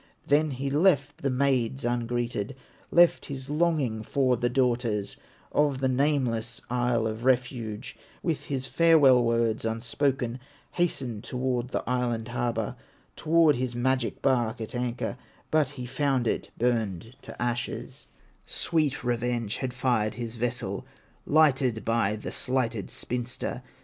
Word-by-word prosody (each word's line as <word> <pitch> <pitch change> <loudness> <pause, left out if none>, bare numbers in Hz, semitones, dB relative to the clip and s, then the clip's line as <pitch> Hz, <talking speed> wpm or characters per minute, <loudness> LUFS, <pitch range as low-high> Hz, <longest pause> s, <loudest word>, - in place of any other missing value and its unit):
Then 150 +2 +3
he 135 0 -3
left 145 -2 +3
the 140 - 0
maids 130 -1 +1
ungreeted, 120 -1 -1 0.3
Left 175 0 +5
his 135 0 -6
longing 150 -8 +1
for 130 +2 +1
the 120 +1 0
daughters 120 -5 0 0.4
Of 145 -3 +2
the 135 - +1
nameless 125 -4 0
Isle 120 -2 +1
of 110 +1 -3
Refuge, 125 -3 0 0.3
With 165 -4 -1
his 130 -2 -2
farewell 145 -5 +5
words 115 -1 +1
unspoken, 120 +2 -1 0.3
Hastened 130 -11 -1
toward 125 -1 -1
the - - -3
island 120 -2 -1
harbor, 120 -1 -1 0.4
Toward 160 -3 +4
his 125 -1 -2
magic 130 0 0
bark 120 -3 +2
at 110 - -5
anchor; 120 -1 -2 0.3
But 155 -2 +3
he 125 - -4
found 130 0 0
it - - -1
burned 115 -2 -1
to - - -11
ashes, 120 0 -3 0.4
Sweet 155 -6 0
revenge 120 -2 -1
had 130 -2 -3
fired 120 -4 0
his 120 -1 -5
vessel, 115 -4 -2 0.4
Lighted 135 -6 +3
by 115 -2 +2
the 110 - -6
slighted 125 -6 -1
spinster. 125 +1 -4
125 Hz, 130 wpm, -27 LUFS, 115-135 Hz, 0.4 s, Left